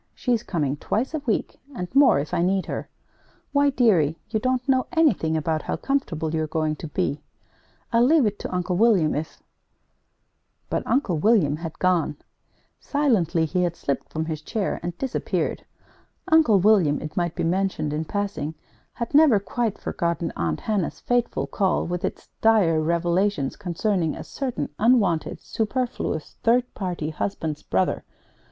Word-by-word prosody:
She's 240 -3 0
coming 150 - -2
twice 235 - -2
a 310 - -1
week, 220 - -1 0.2
and 180 -5 -4
more, 275 - +6
if 145 +4 -3
I 170 - +1
need 190 +2 +1
her. - - -5 0.6
Why, 285 0 +4
dearie, 185 - +3
you 220 - +1
don't 255 +2 -1
know 260 -1 +2
anything 215 - +2
about 155 0 -1
how - - -3
comfortable 165 - -2
you're 155 -1 0
going 155 0 -1
to 160 - -6
be! 150 -1 -2 0.7
I'll 230 - +5
leave 295 +1 +5
it 210 -1 -1
to - - -5
Uncle 180 0 -1
William 200 -8 +4
if 155 +2 -5 0.6
" - - -48
But - - +1
Uncle 195 - +1
William 165 -7 +3
had 165 -1 -7
gone. 180 -5 +1 0.6
Silently 215 - +1
he 180 +3 -1
had 175 -1 0
slipped 140 -4 -3
from 160 0 -2
his 155 -2 -4
chair 205 +5 -2
and 175 0 -5
disappeared. 265 -2 -2 0.6
Uncle 310 -11 +5
William, 185 -7 +4
it 155 - -7
might 175 -1 -1
be - - -2
mentioned 170 -3 0
in 155 +1 -2
passing, 195 -6 -3 0.4
had 235 +2 -5
never 285 -8 +6
quite 220 +1 -2
forgotten 170 -1 -2
Aunt 80 -2 -2
Hannah's 205 -6 -1
fateful 245 -1 0
call 190 -3 0
with 175 +1 -3
its - - -4
dire 195 -8 +4
revelations 170 -1 0
concerning 180 -2 -1
a - - -7
certain 250 - -4
unwanted, 210 -8 +2
superfluous, 225 - -3
third 245 +2 +2
party 175 -5 -3
husband's 155 -2 -3
brother. 95 0 0
180 Hz, 160 wpm, -24 LUFS, 160-230 Hz, 0.7 s, more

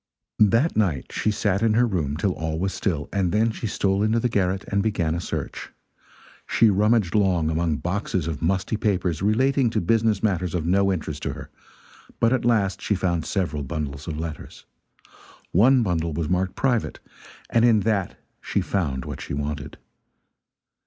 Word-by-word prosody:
That 115 +9 +3
night 90 -11 0
she - - 0
sat 100 -2 0
in 110 -1 +2
her 120 +2 +4
room 80 -10 -1
till 95 +4 +1
all 80 -2 -3
was 95 +3 -1
still, 80 -8 -2
and 95 -3 +1
then 110 +2 +2
she 110 - -4
stole 100 -1 0
into 110 +2 +2
the 125 - 0
garret 95 -3 0
and 100 0 +1
began 95 -7 0
a 85 - -2
search. - - -5 0.8
She 115 -2 +4
rummaged 105 -1 +2
long 90 -6 +2
among 80 -1 0
boxes 95 -1 -2
of 80 -4 -4
musty 95 +5 0
papers 95 -7 0
relating 130 +5 +2
to - - 0
business 110 +2 +1
matters 90 -5 0
of 80 -3 -1
no 100 +3 +3
interest 75 -5 -4
to - - -3
her, - - -10 0.7
but 115 +2 +3
at 125 -3 0
last 105 -5 +1
she 105 - 0
found 85 -3 -1
several 85 -7 -1
bundles 70 +1 -5
of 80 -2 -4
letters. 80 -1 -7 0.9
One 125 +7 +5
bundle 85 -5 -1
was 80 0 -2
marked 90 +2 0
"private," 125 -4 0 0.5
and 115 - +3
in 115 -3 +5
that 100 -3 -1 0.2
she - - -1
found 70 -10 -2
what - - -6
she - - -5
wanted. 75 0 -4
95 Hz, 175 wpm, -24 LUFS, 80-110 Hz, 0.9 s, One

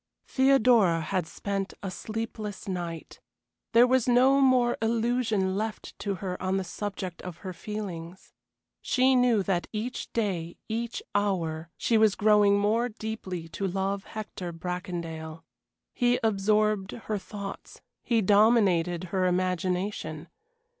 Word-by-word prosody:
Theodora 245 -10 +4
had 165 +2 -2
spent 195 +1 -4
a 195 - -3
sleepless 215 -1 -5
night. 175 -3 -5 0.5
There 235 +1 +8
was 255 -1 +2
no 260 +3 +5
more 255 -2 +4
illusion 225 -4 +1
left 215 +1 -4
to 200 -2 -2
her 185 -1 -5
on 190 +1 0
the 190 - -1
subject 185 -1 -5
of 180 -2 -7
her 185 - -4
feelings. 180 -2 -7 0.5
She 260 +1 +3
knew 245 -5 +3
that 185 -2 -1
each 230 +3 -4
day, 180 -7 -2
each 230 +1 -3
hour, 170 -6 -1
she 225 -2 +2
was 215 -2 +4
growing 210 -1 +5
more 220 +4 +1
deeply 215 -6 -5
to 195 +4 -3
love 195 +1 -2
Hector 205 -5 -6
Bracondale. 165 -2 -5 0.5
He 245 0 +2
absorbed 210 -1 +1
her 215 -3 -4
thoughts, 200 0 -8 0.2
he 230 -3 +1
dominated 195 -5 +4
her 185 -1 +2
imagination. 180 -2 -1
200 Hz, 125 wpm, -28 LUFS, 180-225 Hz, 0.5 s, There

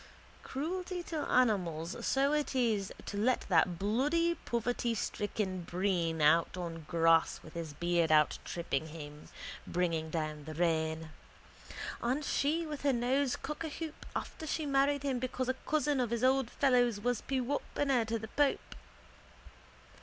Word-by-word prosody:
Cruelty 355 +5 -3
to 330 - -5
animals 180 -9 +2
so 275 +2 +2
it 300 -2 0
is 220 -6 +1
to 200 - -5
let 245 +5 +2
that 175 0 +3
bloody 290 - +2
povertystricken 220 -5 -1
Breen 175 -3 0
out 165 +4 +4
on 165 -3 -5
grass 165 -1 +3
with - - -12
his 165 -3 -5
beard 170 +1 +1
out 150 -1 +4
tripping 160 -3 -2
him, 150 -2 -9 0.4
bringing 165 -3 0
down 155 -2 -3
the 155 - -7
rain. 160 -1 0 0.9
And 260 +5 0
she 315 +6 +1
with 300 -2 -5
her 280 -1 +3
nose 255 +2 +1
cockahoop 310 +1 -5 0.2
after 315 - -5
she 310 +1 -1
married 280 0 +2
him 270 -3 0
because 255 0 -2
a - - +3
cousin 295 -2 +2
of 245 -3 +1
his 235 +1 -1
old 260 -1 +3
fellow's 245 -6 +3
was 245 +1 0
pewopener 270 0 0
to 230 +1 0
the 220 0 -7
pope. 290 +2 +1
230 Hz, 140 wpm, -32 LUFS, 170-275 Hz, 0.9 s, out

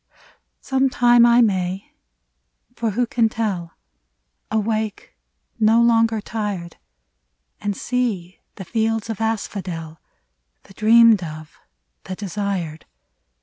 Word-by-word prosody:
Sometime 245 -3 +4
I 235 +1 +5
may 190 -3 -1 0.4
— - - -44
for 230 - -1
who 240 +4 0
can 230 -1 +1
tell? 195 -7 -3 0.4
— - - -51
Awake, 215 - -2 0.4
no 220 +2 +4
longer 230 -1 +3
tired, 205 -5 -5 0.8
And 205 -1 -3
see 220 -8 -2 0.2
the 190 - -8
fields 225 +1 -1
of 225 - -6
asphodel, 185 -7 -4 0.6
The - - -17
dreamed 225 0 +5
of, 155 -1 -9 0.5
the 185 - -5
desired. 190 -5 -4
215 Hz, 105 wpm, -21 LUFS, 180-230 Hz, 0.8 s, I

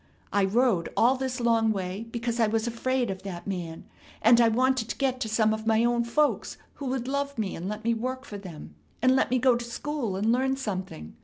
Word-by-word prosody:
I 200 -1 +3
rode 210 -4 +2
all 240 +3 +5
this 260 -1 -3
long 230 -2 +3
way 195 +2 -4
because 235 0 -3
I 225 - +4
was 220 +1 0
afraid 245 0 -1
of 190 0 -6
that 185 -3 -7
man, 175 -4 -5 0.4
and 235 +2 +7
I 230 - +6
wanted 250 0 +1
to - - -4
get 260 -2 0
to 220 - -2
some 220 0 +2
of 220 0 -5
my 225 +1 +3
own 240 0 +1
folks, 295 +5 0 0.2
who 280 - -6
would 255 -1 -2
love 280 0 -2
me, 210 -4 -2
and 175 +4 -5
let 210 +1 -5
me 230 +1 +2
work 255 +3 -4
for 205 - -7
them, 160 - -10 0.3
and 255 +2 +4
let 265 - +2
me 255 - +2
go 250 0 +4
to 240 - -3
school 235 -2 -3
and 210 +4 +1
learn 265 +2 +1
something. 185 - -5
230 Hz, 230 wpm, -27 LUFS, 205-255 Hz, 0.4 s, and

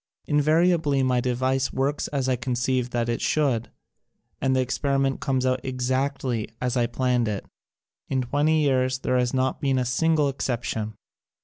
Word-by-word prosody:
Invariably 155 -1 +2
my 125 -1 +2
device 130 +2 0
works 140 +2 -1
as 135 -3 -2
I 130 - +2
conceived 125 0 -1
that 120 -1 -1
it 120 0 -1
should, 135 -7 +1 0.7
and 130 -1 +2
the - - +2
experiment 135 +1 0
comes 130 -2 0
out 130 0 +1
exactly 130 -2 -1
as 125 0 -1
I 120 -2 +2
planned 125 -2 0
it. 105 -2 -3 0.6
In 130 -1 0
twenty 150 +5 +2
years 130 -2 +2
there 125 0 0
has 125 -1 +1
not 130 0 0
been 135 -2 +1
a 125 - +1
single 150 +4 +2
exception. 115 -5 -3
130 Hz, 155 wpm, -25 LUFS, 125-140 Hz, 0.7 s, Invariably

